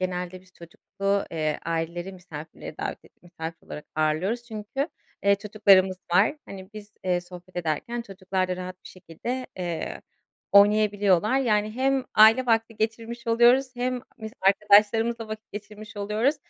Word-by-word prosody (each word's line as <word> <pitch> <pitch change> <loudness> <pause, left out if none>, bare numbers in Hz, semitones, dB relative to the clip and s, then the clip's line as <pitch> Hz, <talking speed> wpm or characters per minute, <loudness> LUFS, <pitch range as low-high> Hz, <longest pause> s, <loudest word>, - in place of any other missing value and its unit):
genelde 180 0 -3
biz 185 0 -24
çocuklu, 195 +4 -3
eee, 155 -2 -1
aileleri 170 +3 -3
misafirlere 165 -4 -10
davet - - -3
edip - - -23
misafir 165 -2 -8
olarak 150 - -8
ağırlıyoruz 155 +10 0
çünkü, 235 +6 -4 0.3
eee, 200 0 +5
çocuklarımız 200 -2 +4 0.2
var. 200 - +4
Hani, 190 0 -10
biz, 210 -1 -11
eee, 180 -1 +1
sohbet 180 +1 -13
ederken 175 +8 -2
çocuklar 190 -3 -3
da 180 - -2
rahat 185 0 -6
bir - - -10
şekilde, 195 +9 -6
eee, 170 -3 -4 0.5
oynayabiliyorlar. 205 +1 +4
Yani, 215 -5 +1
hem 265 +2 +1
aile 225 +4 +7
vakti 225 -1 +1
geçirmiş 230 +2 -3
oluyoruz 245 +3 +4
hem 250 0 -1 0.2
biz 220 -1 -7
arkadaşlarımızla 215 +3 +4
vakit 215 0 -8
geçirmiş 210 +1 -9
oluyoruz. 215 +8 +1
205 Hz, 140 wpm, -26 LUFS, 180-225 Hz, 0.5 s, aile